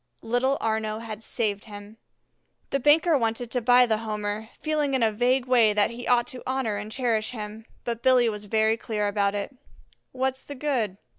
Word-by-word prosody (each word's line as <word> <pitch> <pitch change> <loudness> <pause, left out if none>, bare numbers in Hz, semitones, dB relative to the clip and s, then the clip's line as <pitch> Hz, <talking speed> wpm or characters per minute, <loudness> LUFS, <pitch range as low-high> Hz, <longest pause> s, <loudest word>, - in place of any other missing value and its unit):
Little 245 +4 +1
Arnaux 220 -1 -1
had 220 -2 -7
saved 210 -2 -2
him. 205 0 -11 0.7
The 275 - +1
banker 305 +4 +4
wanted 230 -1 -1
to 250 - -1
buy 245 +2 +6
the 220 -2 0
Homer, 215 0 -4
feeling 300 -3 0
in 255 - +1
a 220 - +3
vague 245 +4 +1
way 235 -4 +4
that 205 +1 +2
he 240 +1 -7
ought 240 -1 +4
to 255 - -7
honor 260 -5 -1
and 215 - -6
cherish 230 -3 -1
him; 215 0 -7 0.2
but 235 -1 -3
Billy 255 -2 +4
was 210 -2 -4
very 220 +2 +2
clear 215 -3 -2
about 200 0 0
it. 205 +6 -4 0.6
"What's 260 0 -2
the 285 - -9
good? 255 -9 -1
230 Hz, 190 wpm, -26 LUFS, 215-255 Hz, 0.7 s, buy